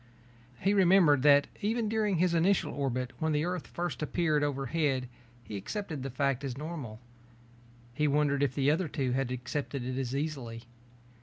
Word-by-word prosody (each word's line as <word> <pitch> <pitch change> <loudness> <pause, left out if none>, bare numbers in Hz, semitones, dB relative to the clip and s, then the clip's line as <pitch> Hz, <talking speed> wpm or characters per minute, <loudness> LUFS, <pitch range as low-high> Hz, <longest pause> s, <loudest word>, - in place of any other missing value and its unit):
He 195 +2 +3
remembered 180 -7 +5
that 145 0 +6 0.2
even 220 +2 0
during 210 -2 +1
his 175 +1 +2
initial 175 +4 +2
orbit 130 -3 -2
when 160 -1 0
the 150 +2 +1
Earth 180 -2 -3
first 175 -2 -4
appeared 155 -1 +1
overhead 135 -1 0 0.4
he 105 - -7
accepted 150 - -4
the 135 - -4
fact 135 +1 0
as 130 -2 -4
normal. 145 -8 -6 0.9
He 150 +4 +1
wondered 145 -1 +2
if 140 -2 +1
the 140 0 +3
other 165 +3 0
two 135 -3 -2
had 130 0 0
accepted 125 +1 -4
it 130 +1 -3
as 130 0 -2
easily. 135 -6 -4
145 Hz, 165 wpm, -30 LUFS, 130-170 Hz, 0.9 s, that